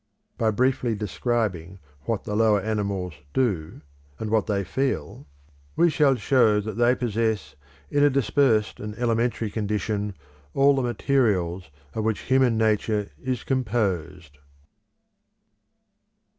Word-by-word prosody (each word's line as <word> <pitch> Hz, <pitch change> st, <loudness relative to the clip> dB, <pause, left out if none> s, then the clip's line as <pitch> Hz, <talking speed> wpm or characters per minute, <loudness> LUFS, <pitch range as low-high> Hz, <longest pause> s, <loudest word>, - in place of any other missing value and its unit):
By 115 Hz, -, +1 dB
briefly 125 Hz, +1 st, +1 dB
describing 100 Hz, -4 st, -2 dB, 0.3 s
what 115 Hz, -3 st, -2 dB
the 105 Hz, -, -4 dB
lower 110 Hz, -1 st, +4 dB
animals 100 Hz, -4 st, -2 dB, 0.2 s
do, 90 Hz, -, -1 dB, 0.4 s
and 110 Hz, -1 st, -4 dB
what 110 Hz, -1 st, +2 dB
they 100 Hz, -2 st, 0 dB
feel, 90 Hz, -, -3 dB, 0.5 s
we 170 Hz, 0 st, +4 dB
shall 145 Hz, -3 st, +3 dB
show 115 Hz, -3 st, +3 dB
that 105 Hz, +1 st, -4 dB
they 120 Hz, +2 st, +3 dB
possess 110 Hz, -3 st, -1 dB, 0.4 s
in 145 Hz, 0 st, +3 dB
a 145 Hz, -, +6 dB
dispersed 125 Hz, -4 st, +2 dB
and 105 Hz, 0 st, -6 dB
elementary 115 Hz, -2 st, 0 dB
condition 105 Hz, -1 st, -2 dB, 0.4 s
all 140 Hz, +1 st, +5 dB
the 135 Hz, -, +1 dB
materials 105 Hz, -, 0 dB, 0.2 s
of 110 Hz, -, -2 dB
which 110 Hz, -1 st, -1 dB
human 130 Hz, -3 st, +2 dB
nature 105 Hz, -3 st, +1 dB
is 130 Hz, -3 st, -3 dB
composed. 95 Hz, -, -2 dB
110 Hz, 120 wpm, -25 LUFS, 100-125 Hz, 0.5 s, a